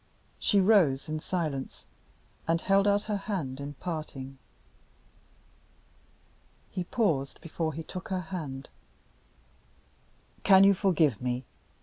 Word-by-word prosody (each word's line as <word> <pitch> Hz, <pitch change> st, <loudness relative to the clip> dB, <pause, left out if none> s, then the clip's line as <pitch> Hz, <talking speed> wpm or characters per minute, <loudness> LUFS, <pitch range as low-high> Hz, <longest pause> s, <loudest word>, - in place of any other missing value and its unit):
She 205 Hz, -, +3 dB
rose 185 Hz, -10 st, +4 dB
in 155 Hz, 0 st, -2 dB
silence, 155 Hz, -6 st, -3 dB, 0.6 s
and 165 Hz, 0 st, +2 dB
held 195 Hz, +3 st, +3 dB
out 205 Hz, 0 st, +3 dB
her 210 Hz, -1 st, -1 dB
hand 170 Hz, -10 st, -4 dB
at 140 Hz, 0 st, -7 dB
parting. 135 Hz, -6 st, -5 dB, 2.3 s
He 180 Hz, -, -2 dB
paused 160 Hz, -, 0 dB
before 160 Hz, -2 st, -3 dB
he 165 Hz, -, -5 dB
took 180 Hz, +2 st, -7 dB
her 185 Hz, -1 st, -1 dB
hand. 135 Hz, -6 st, -5 dB, 1.7 s
"Can 190 Hz, -1 st, +7 dB
you 200 Hz, 0 st, +7 dB
forgive 170 Hz, -, +2 dB
me?" 125 Hz, 0 st, -2 dB
165 Hz, 110 wpm, -29 LUFS, 140-195 Hz, 2.3 s, Can